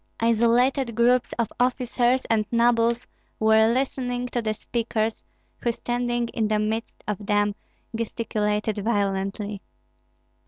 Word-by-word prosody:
Isolated 235 +2 +2
groups 245 +2 +3
of 235 -3 0
officers 250 0 +1
and 215 -2 +1
nobles 235 0 +2 0.3
were 220 +1 +5
listening 250 -1 -1
to 245 - -1
the 215 -1 -1
speakers, 225 0 -2 0.4
who 235 - 0
standing 240 0 -1
in 225 -2 -1
the 215 0 +1
midst 220 +2 -3
of 210 -1 -3
them 205 0 +1 0.4
gesticulated 215 -2 -1
violently. 200 -1 -1
230 Hz, 115 wpm, -25 LUFS, 215-240 Hz, 0.4 s, were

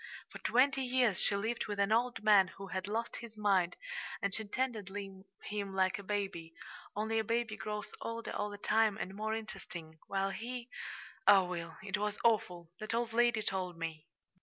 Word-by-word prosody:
For - - -8
twenty 270 +2 +4
years 250 -6 +3
she 200 - +2
lived 220 +4 -1
with 205 -1 -3
an 200 +1 +3
old 240 +1 +2
man 205 -3 +7
who 195 -1 -7
had 190 0 -2
lost 225 +3 -2
his 230 -2 -9
mind, 195 -4 +3 0.4
and 200 -1 -1
she 220 - -2
tended 220 -2 -1
him 195 0 -6
like 190 +1 +2
a - - -7
baby 190 -5 -3 0.4
only 220 +2 +1
a - - +1
baby 230 0 0
grows 210 +1 -4
older 230 0 -4
all 210 - -1
the 205 - -7
time 215 0 +3
and 190 - -4
more 215 +2 -1
interesting, 170 -7 -7
while 195 0 0
he 240 +3 -5 0.6
oh, 200 -2 +9
Will, 170 -2 -5
it 205 0 -1
was 210 0 -1
awful! 180 -7 +2
That 215 +1 -2
old 235 -1 0
lady 240 -2 +4
told 185 -3 -1
me." 165 -1 -5
205 Hz, 185 wpm, -34 LUFS, 190-225 Hz, 0.6 s, oh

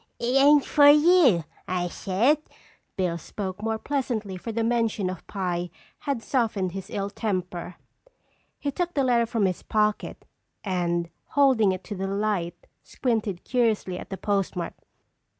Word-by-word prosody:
"It 245 +2 -1
ain't 285 +1 +6
fer 290 -1 +6
you, 300 - +6 0.2
I 180 -1 -1
said." 220 - +1 0.6
Bill 175 -3 -1
spoke 190 +3 -6
more 220 0 -1
pleasantly 230 -7 -2
for 205 +6 -6
the 225 +1 -1
mention 225 -5 0
of 185 - -10
pie 180 -3 -2 0.3
had 275 -5 -3
softened 215 -8 0
his 190 +2 -7
ill 200 0 -3
temper. 180 -5 -3 0.8
He 285 - -2
took 350 +5 -2
the 280 - +2
letter 240 -2 +3
from 225 -3 +1
his 185 -2 -1
pocket 210 -1 -1 0.4
and 175 -3 -1
holding 265 -9 +3
it 185 0 -4
to 205 - -6
the 195 0 -3
light, 195 -4 -2 0.2
squinted 220 -7 -2
curiously 220 -7 0
at - - -9
the 195 - -5
postmark. 195 -3 -1
210 Hz, 150 wpm, -26 LUFS, 185-245 Hz, 0.8 s, ain't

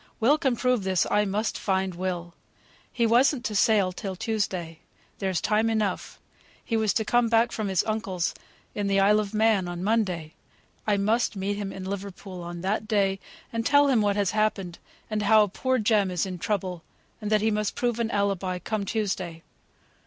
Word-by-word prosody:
Will 275 +7 +4
can 265 -4 +1
prove 250 -3 +1
this. 190 -2 +1
I 210 0 +3
must 210 +3 -1
find 190 -1 0
Will. 175 -1 -4 0.6
He 235 - +1
wasn't 245 +3 +3
to 215 - -2
sail 205 -2 +3
till 190 +1 -5
Tuesday. 185 -6 -3 0.4
There's 190 -3 0
time 215 +4 +1
enough. 215 -4 -2 0.5
He 230 - -1
was 220 -2 +2
to 220 - +1
come 240 +1 +2
back 230 +1 +3
from 215 -2 -3
his 190 -2 +1
uncle's, 195 -5 -2 0.4
in 205 -1 -2
the 195 0 +2
Isle 205 +2 +5
of 210 0 -3
Man, 215 -4 +3
on 175 0 -5
Monday. 185 -8 0 0.5
I 205 -1 +3
must 220 +3 +1
meet 200 +1 -2
him 200 -1 -4
in 190 - -7
Liverpool, 195 -1 -6
on 175 0 -7
that 205 +3 -1
day, 195 -3 +1 0.3
and 230 0 -1
tell 285 +3 +4
him 245 -5 +3
what 205 -1 +1
has 200 -2 +1
happened, 210 -5 -1 0.3
and 215 -1 -2
how 210 +1 +5
poor 260 +6 -1
Jem 215 -3 +2
is 180 -1 -1
in 185 -2 -6
trouble, 185 -3 -2 0.4
and 210 - -3
that 215 -1 +4
he 220 +1 +2
must 210 -1 -1
prove 240 -1 -1
an 230 -1 0
alibi, 195 -3 -1
come 210 +2 -3
Tuesday. 190 -6 -3
205 Hz, 190 wpm, -26 LUFS, 190-220 Hz, 0.6 s, Isle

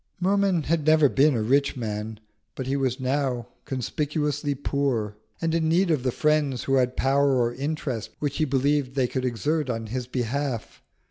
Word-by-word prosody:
Merman 190 -2 +2
had 160 +1 0
never 155 -1 +5
been 140 +1 +3
a 110 - 0
rich 140 +4 +2
man, 110 -2 -4 0.4
but 130 - -4
he 135 +2 -1
was 130 -2 0
now 130 -2 -1 0.2
conspicuously 145 +2 -2
poor, 130 -7 -1 0.2
and 165 -1 -1
in 160 -1 +1
need 175 +2 +3
of 150 -5 +1
the 125 0 0
friends 150 -3 +1
who 135 - -1
had 125 -1 +1
power 140 0 +3
or 120 -1 +1
interest 140 -4 -3
which 145 -2 -2
he 155 - +2
believed 140 0 +1
they 130 -2 +2
could 130 +1 -2
exert 145 +4 -1
on 115 -2 -2
his 125 +2 -4
behalf. 125 0 -3
140 Hz, 180 wpm, -25 LUFS, 125-150 Hz, 0.4 s, never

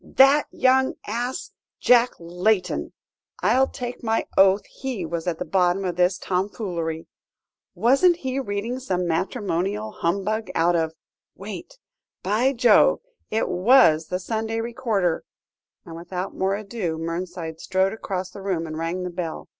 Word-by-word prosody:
"That 275 +3 +5
young 260 0 +2
ass, 240 +4 -3 0.3
Jack 245 0 +5
Layton! 180 +3 0 0.5
I'll 265 +1 +4
take 245 -2 -6
my 225 -1 0
oath 195 +1 +5
he 255 -9 -5
was 165 +1 -4
at 170 -2 -1
the 180 - -4
bottom 180 +2 +1
of 180 -2 -2
this 180 +1 +2
tomfoolery. 180 -4 -3 0.7
Wasn't 275 +10 +4
he 265 -5 -3
reading 230 +1 -3
some 185 -8 -1
matrimonial 195 +3 -1
humbug 200 +5 -1
out 170 +2 +3
of 160 -1 0 0.4
wait! - - -8 0.5
by 220 +8 +2
Jove! 245 - +4 0.3
it 220 - 0
was 180 -6 +5
the 180 - -2
Sunday 220 +3 -3
Recorder," 225 -7 -1 0.6
and 165 -2 -9
without 180 +2 -5
more 190 +1 0
ado, 200 -5 -4
Mernside 165 0 -5
strode 190 +3 +1
across 190 -4 -4
the 200 - -10
room 185 -4 -1
and 155 0 -6
rang 170 +3 -2
the 180 - -4
bell. 170 -2 -5
195 Hz, 140 wpm, -24 LUFS, 175-230 Hz, 0.7 s, That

